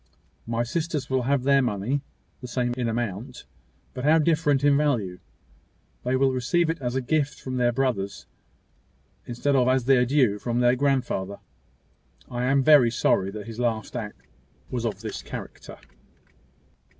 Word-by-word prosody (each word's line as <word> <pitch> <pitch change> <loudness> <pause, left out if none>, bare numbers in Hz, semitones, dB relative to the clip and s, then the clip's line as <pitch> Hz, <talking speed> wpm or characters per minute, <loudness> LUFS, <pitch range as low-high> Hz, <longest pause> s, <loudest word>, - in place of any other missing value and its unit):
My 115 0 0
sisters 155 +2 -3
will 130 -1 +2
have 140 -3 +2
their 140 0 +4
money 125 +3 -1 0.4
the 125 - -8
same 120 0 -1
in 125 -2 -1
amount, 120 +2 -4 0.5
but 125 - -6
how 155 +3 +5
different 150 -3 +2
in 145 -1 +5
value! 120 -12 0 0.8
They 125 +1 0
will 135 0 +3
receive 155 +7 +1
it 165 - -7
as 125 0 -2
a 130 - +1
gift 145 +2 -1
from 130 -1 -5
their 120 -1 +2
brothers, 115 -6 -2 1.0
instead 130 +4 0
of 125 -2 +3
as 130 -1 +2
their 125 -2 +4
due 125 -7 +2
from 120 +2 -1
their 120 0 +4
grandfather. 125 -8 -1 0.9
I 120 0 -2
am 135 +1 +3
very 145 -5 +6
sorry 100 -4 +1
his 115 0 -8
last 115 -3 -2
act - - -6 0.5
was 120 -2 -2
of 105 -3 -5
this 110 -2 -5
character." - - -9
125 Hz, 155 wpm, -25 LUFS, 120-140 Hz, 1.0 s, very